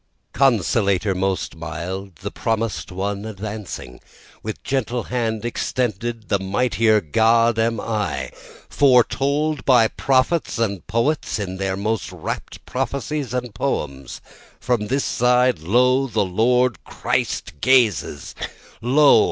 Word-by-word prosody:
2 - - -11
Consolator 105 -6 +2
most 95 -2 -1
mild, 85 +4 -6
the - - -4
promis'd 115 -1 -2
one 100 +2 -3
advancing, 105 - -7 0.4
With 110 0 -6
gentle 125 -3 -1
hand 115 -3 -2
extended, 120 -1 -2
the 100 - +2
mightier 110 +2 +2
God 115 +7 +3
am 115 -1 +1
I, 95 - -2 0.4
Foretold 140 +2 +2
by 120 -4 +5
prophets 135 +5 +1
and 100 -5 -2
poets 120 +7 0
in 95 -3 -4
their 95 0 -2
most 110 +2 -2
rapt - - -6
prophecies 140 0 -3
and 125 -3 -3
poems, 70 - -3 0.4
From 120 -4 0
this 135 +4 0
side, 125 -4 +3
lo! 125 - +3
the 105 -4 0
Lord 120 +6 +2
Christ 75 - -2
gazes 115 - +2 0.5
lo! 140 +5 +6
115 Hz, 120 wpm, -21 LUFS, 100-125 Hz, 0.5 s, lo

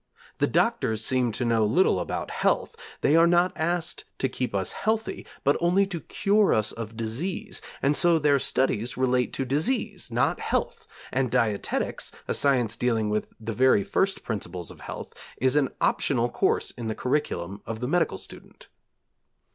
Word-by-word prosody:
The - - +3
doctors 110 0 +1
seem 125 -1 +2
to 120 - -1
know 115 -2 +2
little 115 - +3
about - - -4
health; - - 0 0.3
they 150 - +4
are 165 +1 +6
not 175 +1 +3
asked 170 +1 -1
to 130 - +1
keep 125 -4 -3
us 95 -2 0
healthy, 220 +1 -2 0.2
but 140 - +3
only 180 +3 +3
to 185 -4 -5
cure 205 +4 +2
us 110 0 +2
of 115 -1 -7
disease, 170 - -3 0.2
and 140 +2 +3
so 170 +1 +5
their 145 -2 +3
studies 125 -2 0
relate 125 -1 +1
to 135 - -2
disease, 200 - -1
not 120 +1 +1
health; - - -2 0.2
and 130 -1 0
dietetics, 105 -2 -1 0.2
a - - 0
science 125 -6 +2
dealing 115 -3 0
with 105 0 -1
the 115 0 -4
very 130 -4 +4
first 195 - 0
principles 90 -6 -3
of - - -14
health, - - -7 0.2
is 130 +2 +2
an 145 -3 +3
optional 120 -4 +1
course - - +1
in 115 -2 -6
the 110 - -2
curriculum 100 - -2
of 110 0 -4
the 125 - -2
medical 165 - +1
student. - - -10
130 Hz, 170 wpm, -26 LUFS, 115-170 Hz, 0.3 s, are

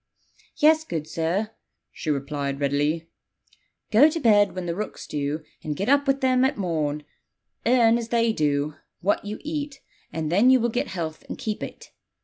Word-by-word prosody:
'Yes, 315 +1 +5
good 160 - -4
sir,' 170 +7 -1 0.4
she 155 - -6
replied 140 -1 -2
readily: 145 +3 0 0.8
'go 255 +8 +7
to 330 - -3
bed 205 -7 +4
when 185 -1 -4
the 170 - -2
rooks 210 +4 -5
do, 150 +1 -3 0.2
and 150 -1 -3
get 200 - -2
up 280 0 +4
with 275 0 +2
them 255 -1 +3
at 265 - +1
morn; 155 -6 -1 0.6
earn, 235 -1 +5
as 230 - -5
they 230 -1 +2
do, 150 -3 0 0.3
what 195 +3 +1
you 210 +1 -4
eat; 295 -2 -4 0.3
and 160 -1 -3
then 205 +8 +5
you 260 0 +6
will 235 0 +1
get 245 - -1
health 160 -4 -5
and - - -5
keep 215 -1 -4
it.' - - -8
200 Hz, 175 wpm, -25 LUFS, 155-245 Hz, 0.8 s, go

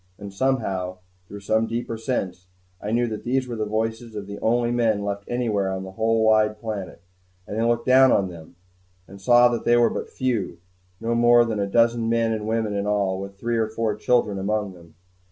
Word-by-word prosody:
And 100 -1 -9
somehow, 100 -7 -1 0.3
through 100 +2 -9
some 110 +3 +1
deeper 115 0 -3
sense, 95 -6 -4 0.3
I 105 - -4
knew 120 +2 +1
that 110 -2 -5
these 130 +1 0
were 120 - -5
the 110 -1 -3
voices 115 +1 -3
of 105 -1 -5
the 100 +1 -8
only 120 +1 +1
men 115 -4 +1
left 100 0 -4
anywhere 110 -6 -1
on 95 0 -4
the 95 - -8
whole 110 +2 +1
wide 110 -1 +3
planet. 100 -6 -6 0.4
And 110 +2 -3
I - - +1
looked 120 0 +1
down 130 0 +6
on 100 - +2
them, 85 -1 -12 0.5
and 100 0 -13
saw 120 +4 +6
that 120 -1 -3
they 120 0 +4
were 120 -1 +4
but - - -5
few, 125 -6 -2 0.4
no 115 +1 -1
more 120 0 +5
than 110 -2 -2
a 100 - 0
dozen 115 +2 +2
men 115 -1 +1
and 110 -1 -3
women 110 -1 -1
in 100 0 -2
all, 100 -2 0
with 100 0 -9
three 120 +3 -2
or 110 - +1
four 110 -1 -1
children 105 -2 +1
among 105 0 -2
them. 85 -2 -17
110 Hz, 210 wpm, -23 LUFS, 100-120 Hz, 0.5 s, down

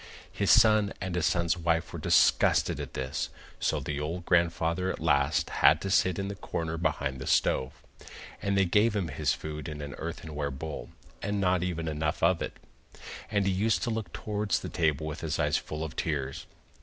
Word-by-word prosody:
His - - -1
son 110 -2 +5
and 95 -1 -4
his 90 -1 +1
son's 85 -1 +1
wife 85 -1 0
were - - -5
disgusted - - +3
at - - -6
this, 65 0 -2 0.3
so - - +1
the 75 -1 -4
old 85 +4 -4
grandfather 85 +1 +1
at - - -3
last 70 -4 +2
had 75 - +7
to 95 - -3
sit 95 -2 +3
in 100 - -2
the 100 - -4
corner 80 -4 -4
behind 65 -5 -1
the 65 - -6
stove, 65 0 +1 0.6
and 100 0 0
they 95 - +4
gave 105 +5 +3
him 95 -5 -1
his 70 -1 0
food 75 -2 -6
in 75 -1 -6
an 70 -1 -6
earthenware 80 -3 -4
bowl, 75 +3 -6 0.3
and 100 +1 -1
not 90 -2 +2
even 85 -2 -2
enough 75 0 -2
of 85 0 +3
it. - - -3 0.8
And 100 -2 +1
he 95 - +2
used 105 +4 +1
to 120 - 0
look 110 -6 -3
towards 105 -2 -1
the - - -5
table 80 -2 0
with 75 0 -5
his 80 -3 -2
eyes - - +2
full 75 +1 -5
of 80 -1 -6
tears. 70 -4 -3
85 Hz, 195 wpm, -29 LUFS, 75-95 Hz, 0.8 s, had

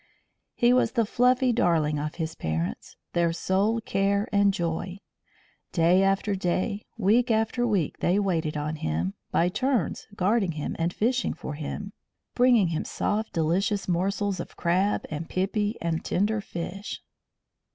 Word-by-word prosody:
He 240 +1 +4
was 255 - +2
the 230 -3 +2
fluffy 250 +3 +3
darling 160 -9 +2
of 150 +1 -4
his 160 -2 -3
parents, 80 - -3 0.2
their 170 -1 +2
sole 195 +6 +1
care 200 0 0
and 200 -1 +4
joy. 175 0 -3 0.8
Day 175 +2 +4
after 195 +1 +1
day, 190 +3 -1
week 230 +4 +3
after 225 +2 +1
week, 195 -9 0
they 180 +3 +2
waited 165 -6 0
on 150 +1 -3
him, 85 - -2 0.2
by 170 - +2
turns 250 - -1
guarding 195 -2 +1
him 150 -1 -4
and 165 +1 +1
fishing 245 +6 0
for 150 - -6
him, 180 +7 -6 0.4
bringing 240 -7 +4
him 160 - -2
soft 215 +2 -2
delicious 180 +4 0
morsels 190 +2 0
of - - -7
crab 185 +4 +1
and 155 +2 -5
pipi 205 +3 -1
and 165 -1 -1
tender 210 +3 0
fish. 195 +2 -6
190 Hz, 145 wpm, -26 LUFS, 165-215 Hz, 0.8 s, He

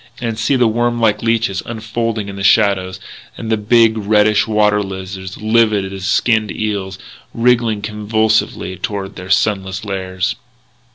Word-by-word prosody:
And 115 -2 -3
see 140 - +1
the 125 -2 +3
worm 120 +1 0
like 110 -2 +2
leeches 115 -4 0
unfolding 110 -1 -3
in 100 - -7
the 100 - -5
shallows, 95 -2 +2 0.4
and 115 - -5
the - - +4
big, 110 +1 +3
reddish 105 +1 +3
water 105 -1 +2
lizards, 95 -1 -7
livid 110 -3 +1
as 95 -1 -6
skinned 110 +1 +2
eels, 100 -3 -3 0.4
wriggling 115 -3 +2
convulsively 110 -2 0
toward 100 0 -4
their 90 0 -9
sunless 95 +1 0
lairs.... 95 -1 -2
105 Hz, 145 wpm, -17 LUFS, 95-115 Hz, 0.4 s, the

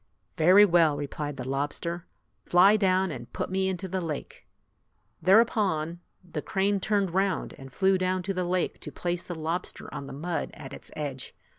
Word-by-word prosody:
"Very 185 +6 +7
well!" 165 -5 +4
replied 145 0 -4
the 125 - -5
lobster. 145 +5 -3 0.4
"Fly 190 +4 +6
down 190 -3 +2
and 120 -5 -8
put - - -4
me 190 0 +1
into 190 0 -3
the 185 +1 -2
lake." 160 -4 -6 0.7
Thereupon, 185 -4 +3 0.2
the 165 -4 -5
crane 195 +3 0
turned 195 -2 0
round 195 +1 0
and 135 -1 -10
flew 190 +7 +2
down 185 0 0
to 195 +2 -2
the 185 -1 -1
lake 180 0 -1
to - - -6
place 175 0 -2
the 175 - -5
lobster 165 +3 -4
on 140 - -6
the - - -8
mud 165 +5 -3
at - - -9
its - - -8
edge. 140 -4 -5
175 Hz, 175 wpm, -27 LUFS, 155-190 Hz, 0.7 s, Very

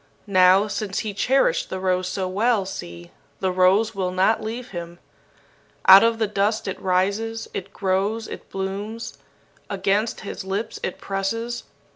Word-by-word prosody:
Now, 190 0 +5
since 205 -2 -3
he 210 - -3
cherished 250 -4 +2
the 190 - -4
rose 185 -1 0
so 185 0 -2
well, 210 +2 +1
see, 85 - -8 0.3
the 190 -1 0
rose 185 +4 +3
will 190 -2 -1
not 185 +4 +2
leave 235 +3 -5
him. 170 -1 -7 0.9
Out 190 +2 +10
of 230 0 +2
the 225 - +1
dust 210 +1 0
it 190 - -4
rises, 200 +5 0
it 195 +1 -5
grows, 200 +4 -1
it - - -9
blooms. 200 +4 -5 0.5
Against 200 +3 0
his 200 - -6
lips 200 +4 -3
it 185 - -3
presses. 230 +5 -3
195 Hz, 150 wpm, -23 LUFS, 185-220 Hz, 0.9 s, Out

